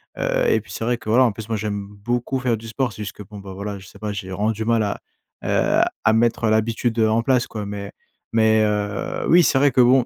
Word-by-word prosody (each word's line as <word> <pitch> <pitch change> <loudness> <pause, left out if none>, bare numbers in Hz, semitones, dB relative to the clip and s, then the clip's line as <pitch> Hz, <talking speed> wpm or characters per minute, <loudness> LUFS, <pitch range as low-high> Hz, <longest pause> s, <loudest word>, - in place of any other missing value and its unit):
Heu - - 0
et 450 - +3
puis, - - -15
c'est - - -5
vrai 120 +1 +1
que 110 - -8
voilà, 125 +4 +5
en 120 - +3
plus, 110 +2 -9
moi 110 - 0
j'aime 100 -1 -3
beaucoup 120 +6 -2
faire 125 -2 +1
du 115 +1 -9
sport, 120 0 -2
c'est - - -9
juste 100 -3 -5
que 105 - -10
bon 105 +1 -11
bah 95 -1 -9
voilà, 100 +1 -5
je 95 - -14
sais 100 - -15
pas, 105 0 -4
j'ai 95 -2 -6
vraiment 100 +4 0
du 110 0 -4
mal 115 0 +2
à, 100 - -3 0.4
heu, - - +2 0.2
à 110 - +4
mettre 115 0 +2
l'habitude, 115 +1 0
heu, 110 -1 +4
en 115 +1 +2
place 125 -1 +2
quoi. 105 -2 -5
Mais 100 0 -6 0.4
mais 110 -1 +4
heu, 105 -1 -2
oui, 175 +2 +7
c'est 150 - +3
vrai 140 0 +4
que 125 - +4
bon, 125 0 +5
110 Hz, 270 wpm, -22 LUFS, 105-120 Hz, 0.4 s, oui